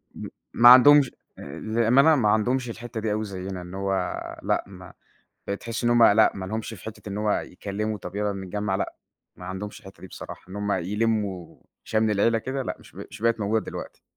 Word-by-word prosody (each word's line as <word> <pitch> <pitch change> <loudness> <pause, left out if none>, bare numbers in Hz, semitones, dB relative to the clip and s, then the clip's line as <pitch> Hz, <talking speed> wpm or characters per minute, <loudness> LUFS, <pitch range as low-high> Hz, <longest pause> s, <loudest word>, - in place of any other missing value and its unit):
م - - -7 0.3
ما 120 +1 +8
عندهمش 135 +1 +8 0.3
آآ 70 - -8
بأمانة 120 +8 +4
ما 110 -6 +2
عندهمش 120 +4 +1
الحتّة 115 0 -6
دي 110 -1 -2
أوي 110 +1 -1
زينا 95 -2 -6
إن 90 +1 -10
هو 95 0 -2 0.5
لأ، - - 0
ما 90 -2 -12 0.5
بتحسي 115 +4 -4
إن 120 - +3
هم 120 -1 +5
لأ، 110 0 +6
ما 95 -1 -5
لهمش 110 +3 -4
في 100 - -12
حتّة 110 -1 -8
إن 100 - -4
هو 105 0 0
يتكلموا 105 +3 -3
طيب 90 +1 -9
يلّا 105 0 -1
نتجمع، 95 +1 -3
لأ، 95 - -3 0.4
ما 90 - -11
عندهمش 95 +3 -6
الحتّة 95 0 -14
دي 95 - -9
بصراحة. - - -10
إن 95 - -8
هم 105 0 -1
يلموا 100 -1 -2 0.2
شمل 110 0 +1
العيلة 115 +3 +2
كده، 130 +3 -4
لأ، - - -4
مش - - -17
بق - - -9
مش - - -11
بقت 115 -1 +2
موجودة 110 +2 0
دلوقتي. - - -8
105 Hz, 205 wpm, -25 LUFS, 95-115 Hz, 0.5 s, ما